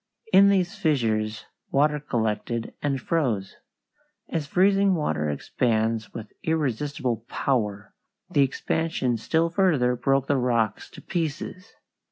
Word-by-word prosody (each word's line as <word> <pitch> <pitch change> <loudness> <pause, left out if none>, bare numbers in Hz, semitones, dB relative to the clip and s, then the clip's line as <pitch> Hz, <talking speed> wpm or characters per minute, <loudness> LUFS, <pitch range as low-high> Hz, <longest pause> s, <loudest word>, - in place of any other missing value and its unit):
In 195 +1 +8
these 185 -3 +1
fissures 110 -8 0 0.2
water 150 +2 +2
collected 115 -3 -2
and 140 -2 0
froze. 125 - -1 0.7
As 155 -3 -2
freezing 195 +3 +3
water 75 - -1
expands 110 - -1
with 110 -2 -9
irresistible 145 -5 -1
power, 105 -6 -1 0.3
the 155 -6 +2
expansion 135 -1 0
still 165 +8 +1
further 155 -10 +2
broke 135 +2 +1
the 140 0 +1
rocks 120 -4 0
to - - -13
pieces. 175 +4 -4
135 Hz, 115 wpm, -25 LUFS, 115-160 Hz, 0.7 s, In